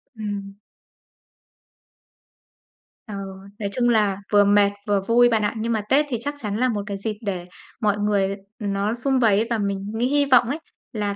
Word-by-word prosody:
Ừm. 205 -2 -5 2.5
Ờ, 205 - -6 0.4
nói 200 -1 -2
chung 240 +1 +1
là 210 -4 +2 0.2
vừa 205 0 +7
mệt, 200 0 +4 0.2
vừa 200 -1 +2
vui 240 +4 +4
bạn 220 -2 +2
ạ. 205 - 0
Nhưng 230 +2 -2
mà 215 - 0
Tết 290 +3 +4
thì 240 - -1
chắc 285 +2 -3
chắn 210 -3 -3
là 255 +1 +2
một 205 -3 -2
cái 200 - -3
dịp 210 +1 -4
để 185 -4 -4 0.4
mọi 210 -1 +2
người, 205 -2 +1 0.3
ừm, 200 -2 -2
nó 200 +3 0
sum 260 +2 0
vầy 215 -4 +4
ấy, 230 - 0
và 230 - 0
mình 200 0 -3
nghĩ 240 +3 +1
hy 285 +1 +3
vọng 250 -4 +5
ấy, 300 +4 -2 0.3
là 205 -2 -2
210 Hz, 195 wpm, -23 LUFS, 200-235 Hz, 2.5 s, vừa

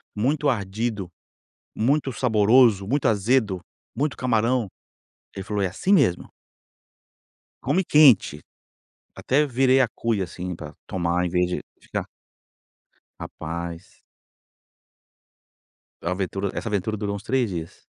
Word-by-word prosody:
muito 140 +7 +1
ardido, 105 -3 -2 0.7
muito 135 +4 +1
saboroso, 110 -3 +4
muito 140 +6 0
azedo, 105 -2 +1 0.4
muito 145 +1 -1
camarão". 120 -1 +1 0.7
Ele 95 - -5
falou: 105 -1 -2
"É 95 - +1
assim 185 - -1
mesmo" 130 - +3 1.3
"come 170 +8 +1
quente". 135 - +5 0.7
Até 145 +4 +1
virei 130 0 +3
a 130 - +3
cuia, 115 -4 -1
assim, 90 0 -6
pra 75 -3 -9
tomar 90 0 0
em - - -1
vez 90 0 +1
de 90 - -3 0.2
ficar - - -4 1.1
Rapaz! 85 +2 -7 2.0
A 85 - -2
aventura 95 +1 -2
essa 115 - -4
aventura 105 +1 -1
durou 100 -1 -3
uns 100 - -8
3 130 -4 0
dias. 85 -3 -7
105 Hz, 115 wpm, -24 LUFS, 95-130 Hz, 2.0 s, quente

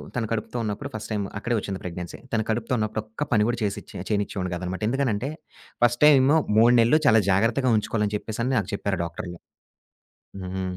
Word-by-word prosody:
తను 115 -3 -1
కడుపుతో 115 +2 -3
ఉన్నప్పుడు. 110 +7 -4
ఫస్ట్ 110 - -6
టైమ్ 105 -2 -1
అక్కడే 120 +3 -1
వచ్చింది 100 -2 -5
ప్రెగ్నెన్సీ. 90 -1 -6
తను 110 -1 +1
కడుపుతో 115 +2 -1
ఉన్నప్పుడు 110 0 -1
ఒక్క 110 +7 -4
పని 105 -3 +4
కూడా 120 0 0
చేసిచ్చే 100 -1 -4
చేనిచ్చేవాడిని 100 -3 -1
కాదనమాట. 90 +3 -4
ఎందుకనంటే 130 -1 0 0.5
ఫస్ట్ 120 0 +3
టైమూ 145 +1 +6 0.2
3 115 +2 +6
నెలలు 120 +7 +5
చాలా 110 -4 +6
జాగ్రత్తగా 115 +6 +2
ఉంచుకోవాలని 105 -1 -1
చెప్పేసని 115 +4 -3
నాకు 95 - -4
చెప్పారు 100 -2 -2
డాక్టర్లు. 85 +1 -6 1.1
హుహు. 95 +1 -4
110 Hz, 165 wpm, -25 LUFS, 100-120 Hz, 1.1 s, టైమూ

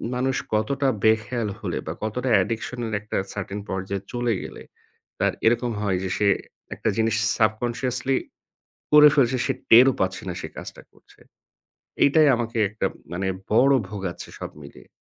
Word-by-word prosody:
মানুষ 130 +1 0 0.2
কতটা 135 +6 +1 0.2
বেখেয়াল 110 +1 +1
হলে - - -3
বা - - -2
কতটা 125 +4 -2
addiction-এর 115 +1 -4
একটা 110 - -4 0.2
certain 100 0 -5
পর্যায়ে 95 +1 -3
চলে 120 -1 0
গেলে - - -9 0.6
তার - - +2
এরকম 120 +1 +2
হয় 95 -3 0
যে 95 - -2
সে 105 - +2 0.5
একটা - - -1
জিনিস 110 -1 +2 0.2
subconsciously 120 +4 0 0.8
করে 150 0 +9
ফেলছে। 130 -3 +3
সে 135 - +1 0.2
টেরও 125 +4 +8
পাচ্ছে 95 0 -1
না 90 - -3
সে - - -5
কাজটা - - -9
করছে। - - -24 0.8
এইটাই 150 +1 +5
আমাকে 115 0 -4
একটা 105 +2 -1 0.3
মানে 95 +2 -2 0.3
বড় 135 +5 +5 0.2
ভোগাচ্ছে 95 -4 -6
সব - - -6
মিলিয়ে। 70 - -14
115 Hz, 150 wpm, -24 LUFS, 105-125 Hz, 0.8 s, করে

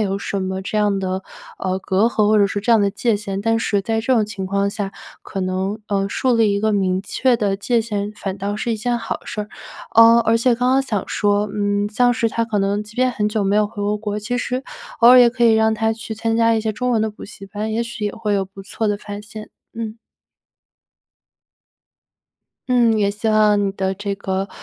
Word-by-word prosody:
有 195 -2 0
什 200 0 -3
么 190 0 -3
这 215 +2 -2
样 205 -2 +2
的， 190 0 -3 0.4
呃， 185 0 -2
隔 190 +2 +1
阂 215 -3 +1
或 215 0 +4
者 200 - +5
说 200 0 -4
这 235 - +3
样 220 - +5
的 200 - +2
界 220 +3 0
限。 200 -1 -4
但 225 0 +2
是 205 -3 0
在 225 +2 -1
这 255 +4 +1
种 220 -3 +3
情 195 -2 -6
况 200 +1 0
下， 205 -2 -4 0.3
可 195 - -5
能， 190 +3 -2
呃， 195 -1 0
树 255 +3 +1
立 225 -1 +4
一 200 - -1
个 215 0 +1
明 190 -2 0
确 245 +4 +1
的 200 -3 0
界 230 +3 +1
限 210 -2 -3
反 195 -1 -5
倒 200 +1 -2
是 230 +2 -2
一 - - -1
件 240 +2 -1
好 230 - -4
事 215 - -5
儿。 210 - -11 0.5
呃， 230 +1 +7
而 230 0 +2
且 240 +1 +3
刚 250 +2 +1
刚 265 +1 +4
想 215 -7 -2
说， 205 0 +1
嗯， 205 0 0
像 245 +2 +3
是 230 -1 0
他 230 +1 -1
可 220 -2 -2
能 200 +1 0
即 210 +1 -15
便 255 0 +2
很 210 -3 -1
久 210 -1 -1
没 195 +1 +1
有 210 - +3
回 205 -1 -7
过 205 +1 0
国， 210 -1 -3
其 245 +4 -3
实 250 +1 -2 0.4
偶 235 - +8
尔 255 - +9
也 245 - +7
可 240 0 0
以 230 - +6
让 220 0 +3
他 220 0 0
去 220 0 -7
参 225 +1 -1
加 230 0 +3
一 220 - +1
些 215 0 -2
中 250 +3 -2
文 225 -3 +2
的 220 - -1
补 210 - -11
习 195 -1 -11
班， 210 +2 -4
也 230 +2 0
许 230 -2 -6
也 205 - -1
会 215 -2 -3
有 195 -1 +1
不 195 +1 -12
错 220 +2 -3
的 205 - 0
发 205 0 -8
现。 215 +1 -10 0.2
嗯。 225 0 -5 2.7
嗯， 235 -3 +3
也 200 -1 +2
希 210 +2 -3
望 210 -1 +3
你 195 - 0
的 190 -1 -2
这 200 +1 -4
个， 190 0 -3
210 Hz, 260 characters per minute, -20 LUFS, 200-230 Hz, 2.7 s, 尔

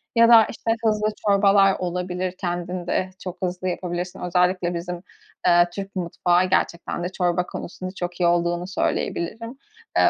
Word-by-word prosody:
Ya 230 0 +6
da, 225 -2 +8
işte, 225 - -3
hızlı 215 -1 +2 0.2
çorbalar 200 -1 +5
olabilir, 180 0 -3
kendin 175 0 -3
de 185 +1 0
çok 180 -1 -7
hızlı 185 0 -2
yapabilirsin. 180 0 -4
Özellikle 180 0 +1
bizim, 175 +1 -5 0.4
eee, 175 0 +6
Türk 195 0 -6
mutfağı 175 0 +1
gerçekten 170 0 -1
de 175 - -2
çorba 180 -1 0
konusunda 185 +1 -7
çok 175 -1 -5
iyi 175 - +4
olduğunu 175 +1 +1
söyleyebilirim. 225 +5 -2 0.4
Eee, - - +6
180 Hz, 150 wpm, -23 LUFS, 175-195 Hz, 0.4 s, da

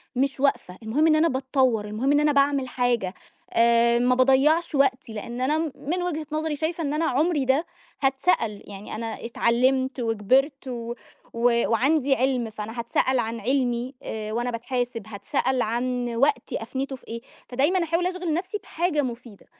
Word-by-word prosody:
مش 270 +1 0
واقفة، 260 -9 0
المهم 270 +9 +2
إن 310 - +5
أنا 325 +2 +4
باتطوّر، 260 -5 +1
المهم 215 +6 -1
إن 290 - +4
أنا 300 0 +3
باعمل 280 -1 +2
حاجة، 240 -7 0 0.4
آآ 235 0 +4
ما 250 +1 +3
باضيّعش 280 +6 +3
وقتي 260 -4 +1
لإن 235 +3 -6
أنا 290 +4 +2
م 320 -2 -1
من 350 +5 -3
وجهة 315 -3 -2
نظري 310 -1 -1
شايفة 320 +3 -2
إن 290 -1 -1
أنا 320 +2 0
عُمري 295 +1 +1
ده، 270 +6 +2 0.4
هتسأل 270 - +1
يعني 200 +1 -8
أنا 225 +1 -5
اتعلّمت 255 +3 +1
وكبِرت 255 +6 +1
و 235 -1 -5 0.4
و 235 0 +2
وعندي 270 +3 +3
عِلم 250 -3 0
فأنا 215 +2 -7
هتسأل 255 +2 +1
عن 230 0 -2
علمي، 250 +1 -1
آآ 215 -1 -5
وأنا 240 +2 -1
باتحاسب 245 -1 -3
هتسأل 250 +4 -1
عن 245 +1 -2
وقتي 270 -2 +1
أفنيته 265 +4 -4
في 255 - -18
إيه، 230 +1 -6 0.3
فدايمًا 295 +9 +2
أحاول 335 +2 0
أشغِل 365 -3 -2
نَفسي 365 +5 -2
بحاجة 325 -3 0
مُفيدة، 235 -4 -7
260 Hz, 165 wpm, -25 LUFS, 235-290 Hz, 0.4 s, إن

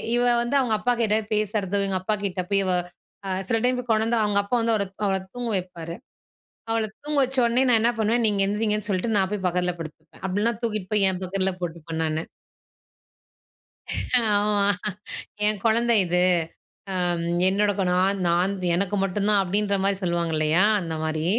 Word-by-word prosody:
இவ 240 - +2 0.2
வந்து 240 +4 -1
அவங்க 250 -4 0
அப்பாகிட்ட 235 -3 +1 0.2
பேசுறதும், 205 -2 0
எங்க 190 -1 0
அப்பாக்கிட்ட 200 -1 -2
பேய் 200 0 +4
இவ 185 - 0 0.6
அ - - -3 0.2
சில 225 - +1
டைம் 250 0 +2
போய் 245 -1 -8
கொணந்து 220 +2 +2
அவங்க 205 -1 0
அப்பா 200 +5 -1
வந்து 230 0 +2
அவர 205 - +1 0.2
அவள 195 -1 +1 0.2
தூங்க 245 -1 -3
வைப்பாரு. 170 -3 -5 0.7
அவள 225 -1 +1 0.2
தூங்க 300 0 -2
வச்சோனே 255 -1 +2
நான் 230 -2 +5
என்ன 235 +2 +4
பண்ணுவேன் 225 +2 +1
நீங்க 205 -2 +1
எந்திரிங்கன்னு 210 +1 -1
சொல்லிட்டு 200 +4 0
நான் 190 -1 +2
போய் 205 -3 -3
பக்கத்தில 180 0 0
படுத்துப்பேன், 160 +1 -11
அப்படின்னா 205 +5 0
தூக்கிட்டு 215 -5 -3
போய் 200 -2 +4
என் 185 0 -4
பக்கத்துல 190 +1 -1
போட்டுப்பன் 165 -1 -4
நானு. 155 0 -2 2.0
ஆமா. 205 -1 +2 0.8
என் 210 -1 +2
குழந்த 235 +1 +3
இது. 180 +1 +1 0.7
அம். 175 -2 0 0.3
என்னோட 205 +2 +2
குனா 180 -2 +1
நான் 195 +2 +1
நான் 180 +3 +2 0.2
எனக்கு 195 +2 0
மட்டும் 195 +1 -1
தான் 205 -2 +4
அப்படின்ற 200 +2 0
மாரி 200 0 +2
சொல்லுவாங்க 170 -2 -1
இல்லயா, 155 +4 +3 0.2
அந்த 165 -3 -5
மாரி. 155 0 -2
200 Hz, 165 wpm, -24 LUFS, 180-220 Hz, 2.0 s, நான்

